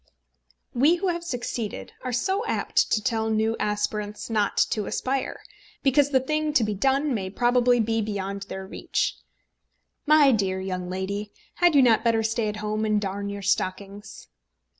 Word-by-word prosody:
We 290 +8 +4
who 370 +2 -1
have 340 -1 -2
succeeded 240 -7 -4
are 255 - -3
so 380 - 0
apt - - 0
to 215 - +1
tell 220 0 0
new 220 +1 +1
aspirants 210 +1 -2
not 210 -2 0
to 210 -3 -1
aspire, 265 0 -2 0.4
because 280 +1 +4
the 265 -2 +3
thing 305 +3 -1
to 260 - +4
be 210 -1 -1
done 270 +7 +1
may 190 -5 -2
probably 245 +3 +3
be 225 0 +1
beyond 200 -1 -4
their 190 0 -6
reach. 190 - -2 0.9
"My 300 -2 +6
dear 195 -5 0
young 185 -1 -4
lady, 200 +3 -4 0.2
had 350 -3 +3
you 275 - +7
not 225 -3 +4
better 225 -1 +2
stay 225 0 0
at 210 - -3
home 215 +1 -2
and 215 -1 +2
darn 200 0 -4
your 200 0 -6
stockings?" 200 +2 -3
220 Hz, 165 wpm, -25 LUFS, 205-260 Hz, 0.9 s, you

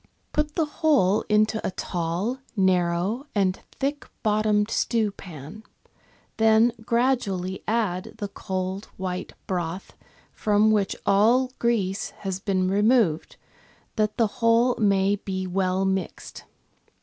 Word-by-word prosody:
Put 300 0 -1
the 325 - +2
whole 285 - +2
into 215 +1 +2
a - - 0
tall, 180 +7 -3 0.2
narrow, 185 - +1
and 190 -2 +1
thick 285 +2 -3
bottomed 210 0 +2
stewpan; 200 - -2 0.8
then 225 +1 +4
gradually 220 -7 0
add 205 -5 -1
the 205 -2 -3
cold, 190 +1 -4
white 185 -1 -4
broth, 180 0 -4 0.4
from 210 +1 +2
which 205 -2 +1
all 235 +6 +4
grease 205 -5 0 0.2
has 190 -1 -2
been 190 -2 0
removed, 205 -4 +2 0.6
that 215 -1 0
the 230 - +4 0.2
whole 230 +2 +4
may 200 -1 +3
be 190 -1 -4
well 185 +1 0
mixed. 190 -2 -3
205 Hz, 115 wpm, -25 LUFS, 185-230 Hz, 0.8 s, then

